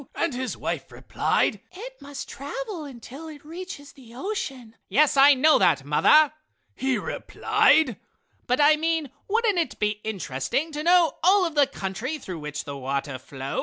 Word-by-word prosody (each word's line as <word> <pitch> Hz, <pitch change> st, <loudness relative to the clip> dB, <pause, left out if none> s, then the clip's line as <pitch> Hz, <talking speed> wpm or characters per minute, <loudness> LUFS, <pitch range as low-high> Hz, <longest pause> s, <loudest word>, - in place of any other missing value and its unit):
And 335 Hz, -, -1 dB
his 255 Hz, 0 st, -4 dB
wife -, -, -4 dB
replied: -, -, 0 dB
"It -, -, -10 dB
must 280 Hz, -1 st, -7 dB
travel 385 Hz, -, -6 dB
until 270 Hz, +3 st, -10 dB
it 295 Hz, -2 st, -11 dB
reaches 325 Hz, -3 st, -8 dB
the 240 Hz, -4 st, -16 dB
ocean!" 265 Hz, -, -5 dB
"Yes, 300 Hz, +1 st, +3 dB
I 280 Hz, +1 st, +7 dB
know 300 Hz, +4 st, +5 dB
that, 140 Hz, -1 st, +3 dB
mother" 295 Hz, -, +5 dB, 0.4 s
he 265 Hz, -1 st, 0 dB
replied, 315 Hz, +2 st, +2 dB, 0.5 s
"but 250 Hz, +2 st, +1 dB
I 300 Hz, +1 st, +6 dB
mean, 320 Hz, -3 st, -1 dB, 0.2 s
wouldn't 430 Hz, -3 st, +1 dB
it 330 Hz, -, -2 dB
be 210 Hz, 0 st, -1 dB
interesting 195 Hz, -, -2 dB
to 300 Hz, 0 st, -4 dB
know 345 Hz, -1 st, +3 dB
all 375 Hz, +2 st, +5 dB
of 330 Hz, -, -3 dB
the 290 Hz, -2 st, +4 dB
country 230 Hz, -, -4 dB
through 185 Hz, -, -7 dB
which 150 Hz, +1 st, -5 dB
the 140 Hz, -, -7 dB
water 135 Hz, 0 st, -3 dB
flows?" 135 Hz, +1 st, -6 dB
280 Hz, 165 wpm, -25 LUFS, 220-325 Hz, 0.5 s, I